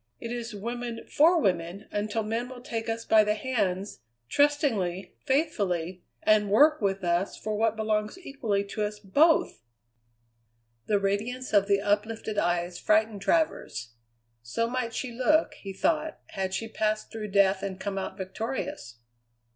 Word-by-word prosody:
"It 230 - -6
is 235 -2 -5
woman 235 +2 -5
for 330 +4 +5
woman 180 - -1
until 210 +2 -1
men 230 +3 -2
will 250 -1 -10
take 225 -2 -4
us 230 0 -3
by 220 -1 +6
the 210 0 +1
hands, 205 -5 -2 0.3
trustingly, 235 - +1
faithfully, 190 - 0 0.2
and 210 -1 +4
work 300 +8 +5
with 195 -1 0
us 175 +2 0
for 215 0 -3
what 225 +1 +1
belongs 215 - -1
equally 250 - -2
to 200 +2 -5
us 210 0 -1
both!" 220 - +3 1.3
The 210 - +3
radiance 215 +6 -2
of 200 -1 +5
the 200 -1 +3
uplifted 210 +1 -1
eyes 175 0 0
frightened 215 0 +2
Travers. 195 - 0 0.5
So 120 - -1
might 240 -2 -3
she 255 - -3
look, 280 +7 +2
he 195 - -8
thought, 310 - 0
had 190 0 -2
she 225 +3 -3
passed 215 -1 -1
through 220 -1 -5
death 195 -1 +3
and 195 -1 -4
come 195 -1 -3
out 190 0 -5
victorious. 190 - -5
215 Hz, 150 wpm, -28 LUFS, 195-240 Hz, 1.3 s, by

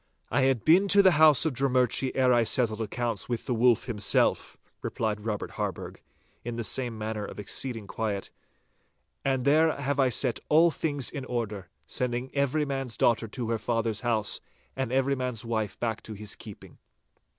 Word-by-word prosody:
'I - - +2
had 130 -3 +1
been 180 +5 +5
to 200 0 +6
the 190 - +6
house 155 -2 +7
of 160 - 0
Drummurchie 130 0 +1
ere 130 -1 +4
I 120 -1 +4
settled 115 -1 +1
accounts 115 0 -3
with 120 -2 -3
the 125 - -1
Wolf 120 0 +3
himself,' 105 -5 +1 0.2
replied 105 -1 -3
Robert 105 -2 -3
Harburgh, - - -5 0.4
in 120 0 -5
the 115 - -3
same 120 +1 -1
manner 110 0 -4
of 100 - -8
exceeding 115 +2 -3
quiet, 100 -1 -4 0.9
'and 135 -2 0
there 155 +2 +4
have 140 0 -2
I 130 -1 +4
set 125 0 +2
all 165 +3 +5
things 145 -4 -2
in 140 -3 -5
order, 105 -7 -4 0.2
sending 125 - -3
every 140 +2 +1
man's 135 -4 -4
daughter 115 -1 +2
to 115 +1 -4
her 115 - -1
father's 115 -3 -1
house 115 -4 0 0.3
and 130 -3 -3
every 135 +1 +1
man's 125 -3 -3
wife 110 -3 -3
back 115 -2 -2
to 110 - -8
his 105 -1 -5
keeping. 105 -3 -12
120 Hz, 175 wpm, -27 LUFS, 110-135 Hz, 0.9 s, house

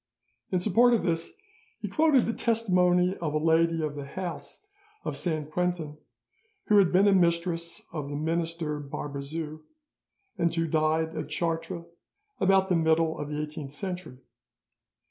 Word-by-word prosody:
In 185 - +1
support 230 +6 +4
of 225 - -1
this, 165 -1 -1 0.5
he - - -4
quoted 305 -5 +3
the 230 - -1
testimony 185 -6 +2
of 155 -3 -3
a - - +4
lady 165 +1 +2
of 150 -1 -2
the 145 -1 -6
house 180 - -6 0.4
of - - -2
Saint 155 -3 -2
Quentin 175 -3 -1 0.7
who 210 -1 +5
had 190 -3 +4
been 195 +3 +5
a 200 - +5
mistress 170 -1 +1
of 150 -3 -4
the 145 - -4
minister 165 0 -2
Barbezieux, 145 +2 -5 0.8
and 170 -1 +2
who 165 -1 +1
died 160 +1 +1
at 155 - -4
Chartres 165 0 -2 0.5
about 190 0 +3
the 180 - +3
middle 160 0 +2
of 145 - -4
the 150 0 -3
eighteenth 150 -2 -6
century. 180 -4 -5
165 Hz, 150 wpm, -28 LUFS, 155-180 Hz, 0.8 s, who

